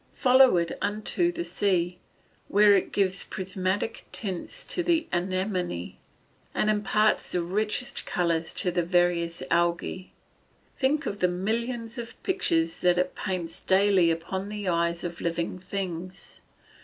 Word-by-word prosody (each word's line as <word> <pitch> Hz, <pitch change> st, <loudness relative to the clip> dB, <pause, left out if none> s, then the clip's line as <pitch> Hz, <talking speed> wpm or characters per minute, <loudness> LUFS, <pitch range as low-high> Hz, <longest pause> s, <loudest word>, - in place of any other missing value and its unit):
Follow 260 Hz, -5 st, +6 dB
it 170 Hz, -1 st, 0 dB
unto 215 Hz, -, +1 dB
the 345 Hz, 0 st, -4 dB
sea, 180 Hz, -3 st, 0 dB, 0.5 s
where 205 Hz, 0 st, +6 dB
it 195 Hz, -, +1 dB
gives 195 Hz, -1 st, +1 dB
prismatic 190 Hz, +3 st, -3 dB
tints 200 Hz, -, -4 dB
to 360 Hz, -, -2 dB
the 335 Hz, -2 st, +2 dB
anemone, 180 Hz, -, -2 dB, 0.6 s
and 215 Hz, -, +2 dB
imparts 210 Hz, +1 st, +1 dB
the 180 Hz, -, +1 dB
richest 210 Hz, +6 st, -1 dB
colours 170 Hz, -2 st, 0 dB
to 180 Hz, -, 0 dB
the 175 Hz, 0 st, +1 dB
various 170 Hz, -2 st, +1 dB
algae. 170 Hz, +2 st, 0 dB, 0.6 s
Think 290 Hz, +4 st, +1 dB
of 205 Hz, -, -3 dB
the 180 Hz, -, +3 dB
millions 230 Hz, +6 st, -2 dB
of 235 Hz, -1 st, -7 dB
pictures 165 Hz, -, 0 dB
that 180 Hz, 0 st, +3 dB
it 180 Hz, 0 st, 0 dB
paints 180 Hz, -4 st, -3 dB
daily 190 Hz, -2 st, +4 dB
upon 190 Hz, +4 st, -3 dB
the 210 Hz, -2 st, -5 dB
eyes 170 Hz, -1 st, 0 dB
of 175 Hz, -1 st, -5 dB
living 170 Hz, +2 st, -2 dB
things. 185 Hz, -1 st, -6 dB
185 Hz, 135 wpm, -27 LUFS, 175-210 Hz, 0.6 s, Follow